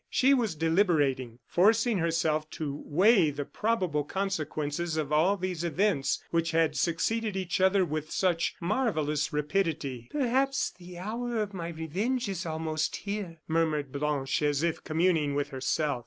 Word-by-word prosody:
She 270 +1 +4
was 230 -10 +1
deliberating, 150 - +1
forcing 220 +3 +3
herself 160 -2 0
to 145 -2 -4
weigh 185 +1 +4
the 145 0 -4
probable 185 -10 0
consequences 160 -2 -2
of 150 -2 -2
all 175 +7 +3
these 180 -3 -3
events 170 -3 +1
which 165 -1 +1
had 165 -1 +2
succeeded 210 +5 0
each 185 0 -1
other 190 0 +4
with 155 -1 -4
such 175 -2 0
marvellous 170 - 0
rapidity. 150 -5 -1
"Perhaps 270 0 +1
the 175 0 -10
hour 230 +5 -3
of 210 -1 -2
my 170 -3 -4
revenge 185 - -2
is 185 -3 -3
almost 155 -1 -2
here," 200 -6 -5
murmured 155 -4 0
Blanche, 140 -1 -1
as 145 0 +1
if 170 -1 -1
communing 160 -3 +1
with 145 0 -1
herself. 135 +1 -1
165 Hz, 145 wpm, -29 LUFS, 150-195 Hz, -, She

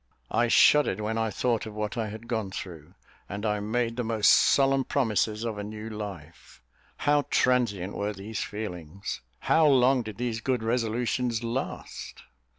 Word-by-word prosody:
I 120 - +2
shuddered 150 +2 +5
when 110 +1 -2
I 110 0 0
thought 115 0 -1
of 105 - -9
what 105 +1 -3
I 115 -2 -2
had 110 +2 -8
gone 110 -5 -2
through, 85 -5 -8 0.3
and 100 +2 -4
I 105 -1 +1
made 115 +3 -1
the 125 - 0
most 110 -2 +3
solemn 135 -1 +4
promises 110 -5 0
of 110 -3 -3
a - - -3
new 110 +1 -7
life. 95 -7 -8 0.4
How 145 -1 +2
transient 110 -7 +1
were 100 +1 -2
these 105 +2 -5
feelings! 95 - -6 0.2
How 160 -1 +4
long 130 -1 +4
did 110 -3 -8
these 120 -2 -2
good 125 -2 -1
resolutions 120 0 0
last? 120 +3 -5
110 Hz, 160 wpm, -27 LUFS, 105-125 Hz, 0.4 s, shuddered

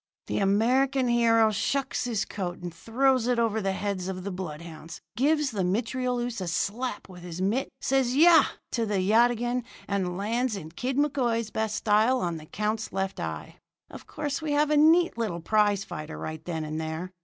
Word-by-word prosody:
"The - - -2
American 250 +7 +2
hero 230 -2 +4
shucks 270 +6 -1
his 220 -5 -1
coat 180 -3 -4
and 175 -1 -7
throws 250 +6 +1
it 250 -1 +2
over 225 -2 +1
the 195 -1 0
heads 190 -2 -3
of 185 -1 -5
the 200 - -4
bloodhounds, 165 -2 -7 0.2
gives 295 +3 +2
the 200 -4 -1
mitrailleuse 240 +3 -1
a 185 - -3
slap 205 +7 -2
with 180 -2 -12
his 175 -1 -7
mitt, 210 +8 0
says 260 -2 +1
'Yah!' 330 +3 +7 0.3
to 230 -2 -1
the 205 -1 0
yataghan, 240 +4 +2 0.2
and 185 -3 -1
lands 230 +4 -1
in 160 -5 -8
Kid 250 +9 -3
McCoy's 245 -6 0
best 220 -1 -1
style 220 +5 +3
on 170 -2 -2
the 155 0 -11
count's 215 +3 -2
left 195 0 -3
eye. - - -5 0.3
Of - - -11
course, 290 0 -3
we 305 -2 -1
have 295 +1 +2
a - - +4
neat 325 -1 +4
little 205 -7 -2
prize 205 +2 +2
fight 155 0 -7
right 160 0 -6
then 160 -3 -3
and 155 +1 -4
there. 160 +3 -5
220 Hz, 185 wpm, -27 LUFS, 185-250 Hz, 0.3 s, Yah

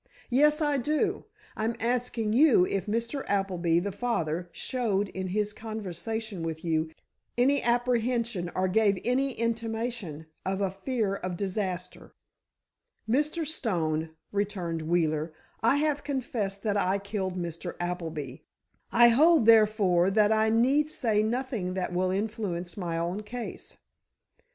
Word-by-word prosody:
"Yes, 300 +5 +4
I 295 -1 +2
do; 310 - 0 0.3
I'm 225 +2 -1
asking 235 -2 0
you 250 - +6
if 195 +1 -2
Mr. 230 +6 -2
Appleby, 180 -4 +1
the 200 +3 -3
father, 180 -6 -2
showed 205 -6 -1
in 190 0 -4
his 210 +2 -1
conversation 220 -1 -5
with 165 0 -4
you, 160 -1 +1 0.5
any 275 +4 +3
apprehension 235 -5 0
or 185 0 +1
gave 200 0 +3
any 265 +2 +1
intimation 230 -8 -3 0.2
of 190 +1 -1
a 195 -2 0
fear 200 0 -1
of 180 -2 -4
disaster?" 185 -2 -4 0.9
"Mr. 300 +7 +1
Stone," 165 - -1 0.2
returned 190 -5 -2
Wheeler, 155 -1 0 0.3
"I 230 +5 +4
have 295 0 0
confessed 235 -8 -3
that 205 -2 +1
I 195 0 +2
killed 195 -2 -3
Mr. 170 0 -5
Appleby; 165 -6 -4 0.5
I 240 0 +7
hold, 305 +2 +5
therefore, 210 -5 +5
that 210 +1 +3
I 220 0 +3
need 265 +7 +3
say 220 -8 +1
nothing 225 -5 -2
that 185 -1 -2
will 185 +1 +1
influence 195 -3 -3
my 175 -4 -3
own 175 +5 -2
case." 235 +3 -7
210 Hz, 130 wpm, -28 LUFS, 180-240 Hz, 0.9 s, I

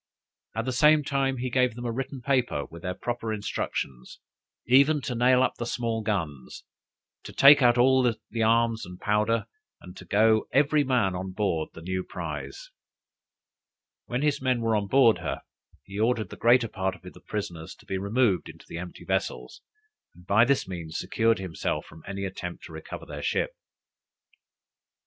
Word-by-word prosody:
At 115 +1 -2
the 130 - -1
same 150 +4 +5
time, 135 -2 0
he 125 0 -3
gave 125 -2 +2
them 120 0 -7
a 120 - -1
written 135 +2 -5
paper 125 - 0
with 85 0 -12
their 90 0 -4
proper 115 +2 -3
instructions, 90 - -4 0.5
even 140 +5 +5
to 125 - -3
nail 125 +2 +4
up - - +1
the 120 - -2
small 115 -2 -2
guns, 80 - -4 0.6
to - - -10
take 140 +1 +7
out 120 -1 +5
all 130 +2 +5 0.2
the 115 - -4
arms 115 0 +2
and 90 0 -9
powder, 105 +2 +1 0.3
and 90 0 -12
to 95 - -11
go 110 +4 +3
every 145 +2 +3
man 125 -8 +1
on 95 +1 -5
board 90 -6 -1
the 80 - -10
new 95 +1 -2
prize. - - -7 1.4
When 125 +3 -2
his 150 -2 +1
men 130 -2 +1
were 115 -1 +1
on 100 -1 -1
board 125 -2 +5
her, - - -4 0.4
he 100 +1 -8
ordered 110 -3 0
the - - -7
greater 120 +1 +4
part 95 -2 -2
of - - -19
the 90 - -12
prisoners 85 -6 -5
to - - -20
be 95 - -3
removed 100 -2 +1
into - - -13
the 85 - -6
empty 90 0 -9
vessels, 60 0 -3 0.5
and 90 +1 -17
by 110 +5 +5
this 140 -4 +1
means 85 -3 -6
secured 115 +4 +1
himself 80 -4 -3
from 80 +1 -14
any 100 0 -4
attempt 90 -2 -6
to - - -10
recover - - -8
their - - -7
ship. - - 0
110 Hz, 175 wpm, -27 LUFS, 95-125 Hz, 1.4 s, take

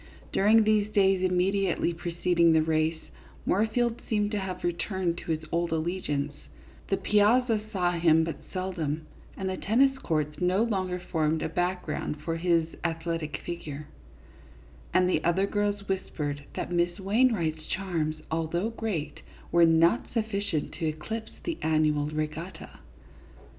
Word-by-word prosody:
During 215 +3 +5
these 215 -1 +2
days 195 -2 +3
immediately 185 0 +1
pre 170 0 -5
ceding 170 -2 +5
the 160 -1 +4
race, 160 0 0 0.4
Moorfield 230 +4 +1
seemed 210 -2 +1
to 210 - -1
have 190 -1 -5
returned 175 0 -1
to - - -4
his 155 0 -2
old 170 0 0
allegiance; 155 -4 -1 0.6
the 195 - +2
piazza 220 +2 +3
saw 180 -4 +1
him 165 -2 +4
but 165 0 -3
sel 185 0 -2
dom, 155 -2 -2 0.4
and 190 - -3
the 190 0 -2
tennis 270 +6 +3
courts 150 - -2
no 185 +4 +3
longer 190 -5 -1
formed 160 -2 0
a - - -1
background 175 -3 -2
for 165 +1 -2
his 170 -1 +2 0.2
athletic 165 -3 -2
figure, 150 -4 -6 1.0
and 185 0 +4
the 185 - +1
other 180 +3 +2
girls 205 0 -1
whispered 145 -7 -3
that - - -3
Miss 175 +2 +1
Wainwright's 195 -7 +1
charms, 170 -5 -1 0.2
although 165 +6 -1
great, 185 -10 -3 0.3
were 170 0 +6
not 165 +7 +3
sufficient 205 -7 -1
to 160 - 0
eclipse 220 +9 -4
the 335 -2 -3
annual 155 -2 +2
regatta. 155 +4 -5
175 Hz, 140 wpm, -28 LUFS, 160-200 Hz, 1.0 s, were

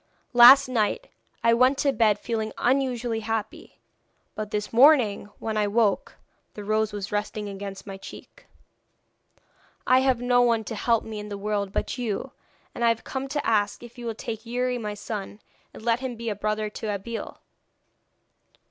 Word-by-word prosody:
Last 250 +3 +9
night 255 - -1 0.3
I 230 0 +5
went 255 +3 +4
to 280 -1 +1
bed 215 -4 +3
feeling 220 -1 -3
unusually 245 -3 0
happy, 225 -1 -5 0.5
but 215 -1 -5
this 210 +1 -3
morning 240 -6 +5
when 220 -1 -3
I 210 -1 +2
woke 210 -1 +1 0.4
the 210 - -7
rose 215 +1 0
was 205 -1 -6
resting 210 0 -3
against 195 -1 -7
my 195 -1 -7
cheek. - - -13 1.4
I 255 0 +5
have 260 -2 +2
no 245 0 +3
one 230 -2 +2
to 220 - -6
help 230 +1 +1
me 220 -1 -6
in 210 0 -7
the 205 - -5
world 200 -1 -2
but 250 - -3
you, 240 +2 -3 0.4
and 235 - -4
I - - +5
have 230 -1 -1
come 270 0 -4
to 290 +1 -3
ask 205 0 +1
if 240 +1 -12
you 240 - -6
will 225 - -3
take 220 0 -6
Youri 250 +1 -2
my 210 -2 -4
son, 205 0 -6 0.3
and - - -12
let 235 0 +2
him 260 -2 -4
be 230 0 -4
a 210 - -2
brother 215 +1 -2
to 220 - -6
Abeille?' 215 +3 -5
225 Hz, 175 wpm, -25 LUFS, 210-245 Hz, 1.4 s, Last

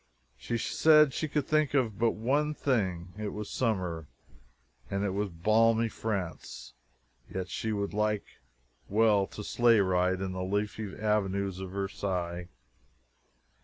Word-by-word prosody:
She 120 - -3
said 150 +3 +5
she 155 - -2
could 150 -2 -1
think 155 -1 +1
of 115 -7 +1
but 115 -1 +2
one 145 +7 0
thing 95 -11 -1
it 105 - -2
was 105 -1 -6
summer, 90 - -1 0.8
and 100 0 -1
it 100 - 0
was 100 +1 -1
balmy 110 +6 +3
France 95 - -5 0.6
yet 95 -1 -4
she 110 - -2
would 100 -1 -2
like 105 0 0 0.6
well 105 -2 +3
to 105 - -8
sleigh 115 +1 +4
ride 95 -1 +2
in 95 -1 -3
the 95 0 -4
leafy 105 +1 -2
avenues 100 -3 0
of 95 -1 -5
Versailles! 90 -3 -3
105 Hz, 135 wpm, -30 LUFS, 95-115 Hz, 0.8 s, said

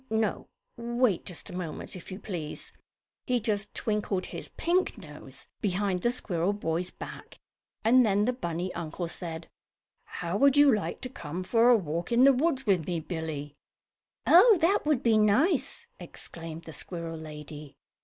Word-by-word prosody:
No, 220 -1 -1 0.3
wait 235 -4 0
just 180 +2 -6
a - - -7
moment 175 -2 -5
if 185 - -10
you 185 - -5
please. 170 -7 -6 0.5
He 250 -1 +2
just 210 -2 -2
twinkled 210 -3 -1
his - - -8
pink 355 -4 +1
nose 150 -7 -11
behind 195 -2 0
the 240 - +2
squirrel 190 -6 0
boy's 175 -3 -2
back, - - -10 0.5
and 250 +3 +6
then 205 -2 +2
the 250 - +1
bunny 175 -6 -3
uncle 170 +1 -4
said: 165 -1 -6 0.6
"How 175 +2 -3
would 280 +4 +4
you 290 -2 +7
like 210 - -2
to 255 - -4
come 175 - -6
for 230 +5 +4
a 245 - +7
walk 170 +1 -4
in 235 +2 +5
the 275 0 +8
woods 270 0 0
with 185 -7 +2
me, 175 -2 -1
Billie?" 155 -3 -5 0.7
"Oh, 390 +5 +8
that 335 -1 +2
will 305 -3 +4
be 230 -3 +3
nice!" 240 - +2
exclaimed 165 -1 -9
the 160 - -10
squirrel 170 -1 -5
lady. 150 -2 -9
195 Hz, 165 wpm, -28 LUFS, 165-240 Hz, 0.7 s, the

